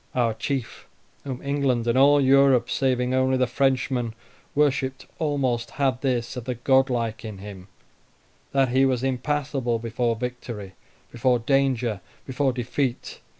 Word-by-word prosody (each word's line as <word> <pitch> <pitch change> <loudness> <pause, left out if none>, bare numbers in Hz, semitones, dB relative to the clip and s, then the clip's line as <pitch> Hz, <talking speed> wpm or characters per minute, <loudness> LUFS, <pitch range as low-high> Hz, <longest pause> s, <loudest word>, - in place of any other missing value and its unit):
Our 120 -3 +2
chief, 125 +2 -4 0.4
whom 130 -2 -5
England 140 -4 0
and 120 0 +1
all 140 +2 +6
Europe, 135 -2 +4
saving 125 -2 +1
only 130 0 +2
the 130 - +3
Frenchmen, 125 -2 0 0.4
worshipped 135 -2 +1
almost, 135 -6 0
had 135 -3 -1
this 125 -3 -1
of 125 -2 -6
the 125 -1 -2
godlike 125 -3 +1
in 110 -3 -7
him, 95 -1 -10 0.8
that 135 -2 +2
he 130 +2 +3
was 130 -2 +1
impassible 135 -2 -1
before 115 +1 -1
victory, 115 -4 -6 0.4
before 125 +1 +2
danger, 125 -4 0 0.2
before 135 +1 0
defeat. 125 +1 -3
130 Hz, 135 wpm, -24 LUFS, 120-135 Hz, 0.8 s, all